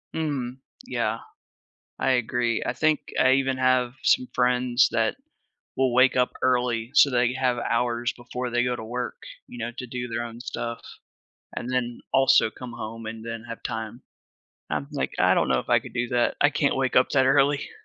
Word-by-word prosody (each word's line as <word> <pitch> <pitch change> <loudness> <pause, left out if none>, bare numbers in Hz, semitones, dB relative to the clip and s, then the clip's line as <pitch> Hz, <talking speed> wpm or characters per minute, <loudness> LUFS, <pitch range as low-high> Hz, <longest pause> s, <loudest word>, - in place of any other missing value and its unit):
Mm, 135 -6 -2 0.3
yeah, - - -1 0.8
I - - +1
agree, 120 -1 0
I - - 0
think 155 +4 0
I 130 - +5
even 135 -1 +1
have 130 -1 +2
some 125 - +3
friends 125 0 +3
that 115 - 0 0.6
will 130 -2 +1
wake 130 +1 +5
up 125 -1 +2
early 120 -2 +1
so 145 -1 +6
they 125 -1 +2
have 130 -1 0
hours 120 0 0
before 125 +1 -5
they 120 0 +1
go 125 0 0
to 110 - -7
work, 125 +3 -4 0.3
you - - -11
know, 120 0 -4
to 125 - -6
do 125 0 -5
their 120 0 -3
own 115 0 -8
stuff, 120 -2 -5 0.8
and 120 - -4
then 120 -2 -2
also 135 -4 +4
come 125 0 -9
home, 115 0 -7
and 110 0 -7
then 115 0 -6
have 115 - -8
time. 110 +1 -5 0.7
I'm 75 -2 -2
like, - - -2
"I - - +5
don't - - +1
know - - +3
if - - -9
I - - +5
could - - -12
do 120 0 -1
that. 120 -1 +1
I 145 - +5
can't 145 -1 +1
wake 130 -1 0
up 125 - +5
that 130 -2 +3
early." 140 +1 +3
125 Hz, 190 wpm, -25 LUFS, 120-130 Hz, 0.8 s, so